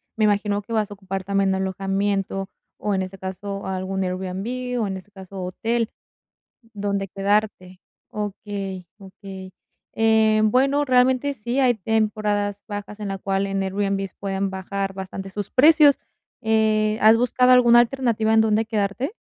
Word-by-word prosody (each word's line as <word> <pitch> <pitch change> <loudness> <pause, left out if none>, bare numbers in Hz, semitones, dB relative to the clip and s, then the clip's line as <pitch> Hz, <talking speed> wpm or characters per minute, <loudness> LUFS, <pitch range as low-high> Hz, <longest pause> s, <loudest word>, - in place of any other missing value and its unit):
me 220 - 0
imagino 205 0 +1
que 210 - -14
vas 215 -2 0
a - - -7
ocupar 195 -1 -6
también 195 0 +1
alojamiento, 195 +1 -1 0.3
o 210 - -2
en 190 - 0
ese 190 +1 -6
caso, 195 +1 -6
algún 190 0 -2
Airbnb, 200 +7 -3
o, 210 - 0
en 190 - -3
ese 190 +2 -11
caso, 190 -1 -8
hotel 225 +5 -2 0.8
donde 200 -1 -2
quedarte. 195 -1 -1 0.3
Okey, 200 -3 -5
okey. 190 -1 -11 0.4
Eh, 220 -1 +3
bueno, 270 +6 +3
realmente, 255 +2 +2
sí, 240 +3 -2
hay 250 -3 +4
temporadas 210 -1 -1
bajas 205 0 -7
en 205 -1 -4
la 195 0 -4
cual 195 0 -1
en 195 0 -2
Airbnb 195 0 -1
pueden 195 0 -2
bajar 195 +1 -4
bastante 195 0 -6
sus 205 +1 -5
precios. 295 +1 +6 0.4
Eh, 215 -1 +2
¿has 220 +1 +7
buscado 250 +2 +3
alguna 240 -1 +7
alternativa 235 -3 +2
en 220 - +6
donde 220 0 +2
quedarte? 215 - -2
205 Hz, 150 wpm, -23 LUFS, 195-220 Hz, 0.8 s, has